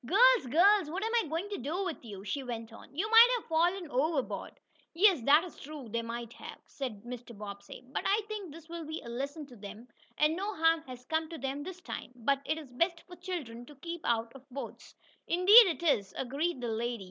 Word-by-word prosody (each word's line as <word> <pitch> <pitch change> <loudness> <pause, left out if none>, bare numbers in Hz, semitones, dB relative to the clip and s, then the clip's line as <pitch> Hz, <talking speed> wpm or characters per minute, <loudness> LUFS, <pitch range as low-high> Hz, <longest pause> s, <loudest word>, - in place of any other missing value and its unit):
"Girls, 470 - +5
girls! 370 - +5
What 375 +6 -3
am 445 - -1
I 460 -7 +2
going 330 +5 -2
to 410 - -4
do 335 +10 -2
to 245 - -15
you?" 195 -3 -8
she 275 +8 -2
went 230 -3 -6
on. - - -13
"You 385 +7 0
might 455 +1 +10
have 460 - -9
fallen 345 +3 +1
overboard." 275 +1 -1 0.4
"Yes, 370 - +5
that 295 +4 +6
is 360 - -10
true, 285 -5 -9
they 230 +2 -1
might 235 0 -6
have," - - -9
said 245 -8 -6
Mr. 240 -2 -8
Bobbsey. 200 +3 -9
"But 260 - -3
I 410 +3 +3
think 415 -6 -6
this 320 +1 -12
will 340 0 -6
be 315 +1 -5
a 235 - -9
lesson 280 +6 -4
to 260 -3 -14
them, 215 +3 -10 0.3
and 305 +1 +3
no 400 +3 -3
harm 325 0 +3
has 250 -1 -10
come 320 +2 -1
to 330 - -7
them 270 +1 -3
this 365 +3 -8
time. 305 - -7
But 275 +3 0
it 310 - 0
is 295 -5 -9
best 335 +7 0
for 355 - -12
children 330 -11 -6
to 295 - -13
keep 335 +4 -6
out 230 0 0
of 270 +1 -15
boats." 275 +2 -8 0.3
"Indeed 400 +6 +8
it 340 -1 -2
is," 205 - +1
agreed 280 +3 -2
the 240 - -2
lady. 235 +2 -2
300 Hz, 225 wpm, -31 LUFS, 245-350 Hz, 0.4 s, might